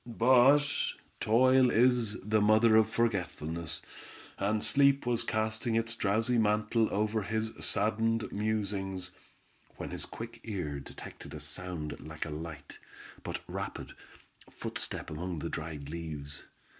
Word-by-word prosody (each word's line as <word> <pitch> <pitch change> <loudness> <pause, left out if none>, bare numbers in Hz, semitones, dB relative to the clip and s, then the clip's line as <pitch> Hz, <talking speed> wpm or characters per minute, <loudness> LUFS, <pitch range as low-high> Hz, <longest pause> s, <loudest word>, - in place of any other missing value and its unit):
But 130 +5 +5 0.5
toil, 130 +3 +5
is 120 -2 +3
the 105 +1 +2
mother 110 +2 +5
of 110 0 +5
forgetfulness, 85 -8 -2 0.6
and 105 +2 +1
sleep 140 -1 +4
was 120 -1 +1
casting 110 +1 -1
its 115 0 0
drowsy 115 +3 +1
mantle 105 +1 +2
over 105 +2 +1
his 110 +2 -2
saddened 115 +1 +1
musings, 100 -3 -2 0.7
when - - -6
his - - -2
quick 115 +1 -8
ear, 85 -10 -3
detected 70 +1 -10
a - - -6
sound 75 +1 -3
like 80 +1 -6
a 75 - -6
light, 75 -1 -7 0.4
but - - -5
rapid, - - -5 0.6
footstep - - -4
among 85 +3 -4
the 75 - -3
dried 75 -3 -5
leaves. 75 -3 -6
105 Hz, 125 wpm, -31 LUFS, 85-115 Hz, 0.7 s, But